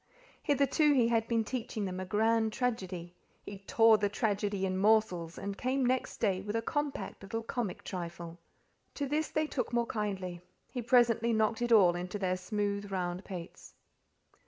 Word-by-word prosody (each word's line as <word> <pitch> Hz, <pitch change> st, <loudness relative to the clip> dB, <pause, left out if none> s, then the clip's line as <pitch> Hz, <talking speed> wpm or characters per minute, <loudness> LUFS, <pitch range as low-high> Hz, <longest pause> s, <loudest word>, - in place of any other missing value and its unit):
Hitherto 290 Hz, +1 st, +3 dB
he 240 Hz, -4 st, +3 dB
had 225 Hz, -1 st, +1 dB
been 230 Hz, -1 st, +1 dB
teaching 220 Hz, -3 st, -3 dB
them 185 Hz, -1 st, -4 dB
a 185 Hz, -, -4 dB
grand 220 Hz, +3 st, +2 dB
tragedy; 185 Hz, -9 st, -3 dB, 0.3 s
he 200 Hz, -1 st, -8 dB
tore 225 Hz, +2 st, +4 dB
the 205 Hz, 0 st, +1 dB
tragedy 205 Hz, -2 st, -1 dB
in 185 Hz, 0 st, -1 dB
morsels, 195 Hz, -6 st, +2 dB
and 200 Hz, 0 st, -4 dB
came 260 Hz, +4 st, 0 dB
next 255 Hz, +1 st, 0 dB
day 195 Hz, -4 st, +1 dB
with 205 Hz, +2 st, -4 dB
a 225 Hz, -, +1 dB
compact 290 Hz, +3 st, -3 dB
little 225 Hz, +3 st, -4 dB
comic 225 Hz, -5 st, -3 dB
trifle. 170 Hz, -1 st, -6 dB, 0.6 s
To 285 Hz, -, -2 dB
this 300 Hz, +3 st, 0 dB
they 310 Hz, 0 st, 0 dB
took 255 Hz, -6 st, -3 dB
more 235 Hz, -1 st, +1 dB
kindly; 190 Hz, -6 st, -3 dB, 0.3 s
he 250 Hz, -, -3 dB
presently 235 Hz, -1 st, +3 dB
knocked 220 Hz, +1 st, +1 dB
it 240 Hz, 0 st, 0 dB
all 185 Hz, -6 st, +6 dB
into 180 Hz, +3 st, -4 dB
their 185 Hz, -2 st, 0 dB
smooth 200 Hz, +1 st, -2 dB
round 180 Hz, -1 st, -2 dB
pates. 180 Hz, -3 st, -9 dB
210 Hz, 170 wpm, -31 LUFS, 185-235 Hz, 0.6 s, all